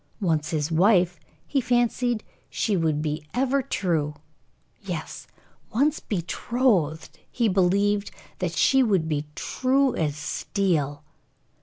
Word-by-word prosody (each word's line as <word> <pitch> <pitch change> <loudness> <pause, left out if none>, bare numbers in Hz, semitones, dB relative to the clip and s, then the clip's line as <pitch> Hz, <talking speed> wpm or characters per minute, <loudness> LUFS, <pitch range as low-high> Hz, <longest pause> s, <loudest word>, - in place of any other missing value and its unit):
Once 160 -6 0
his 155 -2 -1
wife, 180 0 +3 0.3
he 275 - 0
fancied 240 -1 +1 0.3
she 210 - 0
would 155 -3 0
be 150 0 -2
ever 270 +2 +2
true. 160 - -1 0.7
Yes, - - -6 0.4
once 285 +7 +2
betrothed, 180 - -1
he 235 -2 +1
believed 200 +2 +2 0.3
that - - -2
she 270 -1 +4
would 195 -10 +2
be 150 -1 -2
true 265 0 +1
as 150 -3 -1
steel. 150 -1 -1
190 Hz, 115 wpm, -25 LUFS, 155-240 Hz, 0.7 s, she